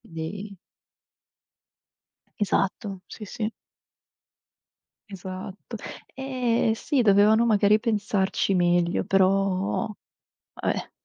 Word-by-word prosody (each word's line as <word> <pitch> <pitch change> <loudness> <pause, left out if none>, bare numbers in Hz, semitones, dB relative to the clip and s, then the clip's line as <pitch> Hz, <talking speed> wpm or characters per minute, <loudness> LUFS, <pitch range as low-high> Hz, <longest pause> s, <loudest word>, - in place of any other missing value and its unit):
dei 190 +5 -7 1.8
Esatto, 195 -1 -1
sì, 215 - -9
sì. 215 +2 -3 1.6
Esatto. 190 +3 -8 0.4
Ehm, 250 -4 0
sì 265 +4 0
dovevano 210 +2 +5
magari 210 -1 +4
pensarci 205 -4 0
meglio, 175 0 +2
però 195 0 +2 0.7
vabbè. - - -2
200 Hz, 70 wpm, -25 LUFS, 190-220 Hz, 1.8 s, dovevano